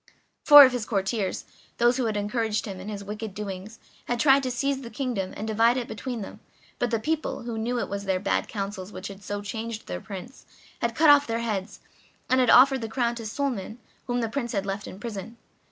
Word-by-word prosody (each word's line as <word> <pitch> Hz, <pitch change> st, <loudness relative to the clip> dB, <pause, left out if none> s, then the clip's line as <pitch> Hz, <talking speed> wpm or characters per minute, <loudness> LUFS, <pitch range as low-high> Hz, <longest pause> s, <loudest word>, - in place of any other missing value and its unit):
Four 290 Hz, -2 st, +11 dB
of 260 Hz, -, +2 dB
his 245 Hz, -4 st, -3 dB
courtiers, 195 Hz, -1 st, -1 dB, 0.3 s
those 240 Hz, +1 st, +3 dB
who 255 Hz, -, 0 dB
had 215 Hz, -2 st, -1 dB
encouraged 220 Hz, +1 st, -1 dB
him 195 Hz, -4 st, -6 dB
in 190 Hz, +3 st, -7 dB
his 200 Hz, -1 st, -5 dB
wicked 210 Hz, 0 st, -6 dB
doings, 205 Hz, +1 st, -6 dB, 0.3 s
had 240 Hz, -1 st, -2 dB
tried 275 Hz, +1 st, +5 dB
to 260 Hz, -, -2 dB
seize 275 Hz, +2 st, -1 dB
the 235 Hz, -, -8 dB
kingdom 230 Hz, -6 st, -3 dB
and 215 Hz, -, -4 dB
divide 230 Hz, +3 st, +3 dB
it 245 Hz, -, -3 dB
between 230 Hz, +2 st, -5 dB
them, 195 Hz, -, -8 dB, 0.4 s
but 245 Hz, -, +1 dB
the 230 Hz, -1 st, 0 dB
people, 315 Hz, +4 st, -2 dB
who 235 Hz, -1 st, -4 dB
knew 235 Hz, +3 st, -1 dB
it -, -, -1 dB
was 200 Hz, 0 st, -5 dB
their 190 Hz, -1 st, +1 dB
bad 195 Hz, -, 0 dB
counsels 195 Hz, -2 st, -5 dB
which 190 Hz, -, -7 dB
had 195 Hz, 0 st, -10 dB
so 205 Hz, +1 st, -4 dB
changed 220 Hz, +2 st, -5 dB
the 90 Hz, 0 st, -5 dB
Prince, 200 Hz, +7 st, -9 dB, 0.3 s
had 235 Hz, -1 st, -1 dB
cut 310 Hz, -1 st, +7 dB
off 290 Hz, 0 st, +5 dB
their 230 Hz, 0 st, -1 dB
heads, 210 Hz, -4 st, -3 dB, 0.5 s
and 260 Hz, -, +5 dB
had 250 Hz, -, +3 dB
offered 265 Hz, 0 st, +7 dB
the 225 Hz, -, -4 dB
crown 235 Hz, 0 st, 0 dB
to 230 Hz, -2 st, -6 dB
Suliman, 235 Hz, -3 st, -3 dB, 0.3 s
whom 245 Hz, 0 st, 0 dB
the 230 Hz, -, 0 dB
Prince 240 Hz, 0 st, -3 dB
had 200 Hz, -2 st, -1 dB
left 195 Hz, +1 st, -4 dB
in 190 Hz, -, -9 dB
prison. 225 Hz, 0 st, -7 dB
225 Hz, 225 wpm, -26 LUFS, 205-245 Hz, 0.5 s, Four